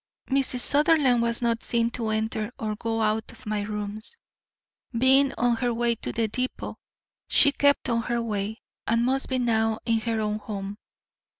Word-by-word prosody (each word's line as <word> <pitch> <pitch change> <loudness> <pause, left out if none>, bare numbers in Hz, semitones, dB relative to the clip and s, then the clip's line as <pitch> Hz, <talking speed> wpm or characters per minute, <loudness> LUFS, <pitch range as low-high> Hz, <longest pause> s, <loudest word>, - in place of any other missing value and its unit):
Mrs. 265 -2 +2
Sutherland 285 -4 +4
was 235 +1 +1
not 230 -1 +1
seen 235 0 0
to 230 -2 -2
enter 220 0 -1
or 215 -4 -3
go 225 +1 -2
out 215 +1 0
of - - -16
my 210 -1 -1
rooms. 210 - -4 0.8
Being 265 +3 +5
on 240 -1 +2
her 245 +1 0
way 235 0 +1
to 230 - -4
the 225 -1 0
depot, 255 +4 -4 0.5
she 285 - +5
kept 285 0 +2
on 230 -2 +1
her 240 0 -1
way, 215 -1 -3 0.2
and 230 +1 +2
must 270 +2 0
be 260 - 0
now 225 -2 +1
in 230 -1 +2
her 225 0 -2
own 210 0 -1
home. 205 -1 -6
230 Hz, 175 wpm, -26 LUFS, 220-250 Hz, 0.8 s, Being